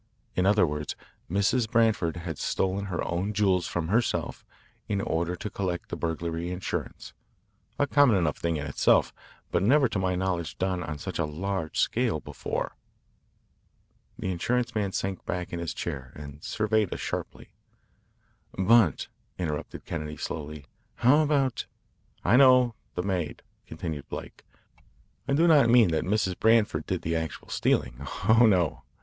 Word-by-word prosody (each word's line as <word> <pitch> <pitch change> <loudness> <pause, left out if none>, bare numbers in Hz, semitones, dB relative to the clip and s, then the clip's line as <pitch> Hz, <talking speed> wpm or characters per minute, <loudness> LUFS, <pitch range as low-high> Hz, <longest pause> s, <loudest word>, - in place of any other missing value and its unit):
In 90 +1 +2
other 100 -2 +5
words, 75 -1 -4 0.3
Mrs. 105 +5 +1
Branford 110 -8 +2
has 85 -3 -5
stolen 95 +1 -1
her 90 -3 -3
own 90 +5 -2
jewels 95 -4 +2
from 85 -2 -3
herself 115 +4 0 0.5
in 100 - 0
order 85 -1 -1
to 105 - -5
collect 90 -3 -3
the - - -3
burglary 85 +1 -3
insurance 90 +1 -5 0.6
a 145 - +3
common 140 -6 +4
enough 85 -5 +1
thing 85 -1 -1
in 75 - -4
itself, 70 - +3 0.4
but - - +2
never 135 +7 +4
to 105 -4 -2
my 95 -1 0
knowledge 90 -3 -2
done 95 -1 -1
on 75 -4 -5
such - - -5
a - - +2
large 85 +2 -3
scale - - +1
before." - - -4 1.4
The 95 - -2
insurance 120 +8 -1
man 105 -3 -1
sank 95 -1 -3
back 90 0 -3
in 85 - -2
his 85 -1 -3
chair 65 -2 -5
and 70 0 -10
surveyed 110 -2 0
us - - -4
sharply. - - -5 1.1
"But," 95 - +4 0.3
interrupted 75 -5 -4
Kennedy 75 -2 -5
slowly, 75 -2 -6 0.3
"how 130 +5 +5
about 145 -4 +1 0.3
" - - -38
"I 120 - +5
know 130 -3 +6 0.2
the 90 - -1
maid," 90 -5 -2 0.2
continued 80 -5 -6
Blake. - - -8 0.8
"I - - +1
do 160 +4 +4
not 145 -7 +6
mean 115 -5 +6
that 80 - 0
Mrs. 95 -2 0
Branford 110 -1 +3
did - - -2
the 80 +1 -1
actual 80 -1 -4
stealing. - - 0 0.3
Oh, 115 +1 +7
no. 90 -8 +2
95 Hz, 155 wpm, -27 LUFS, 85-110 Hz, 1.4 s, Oh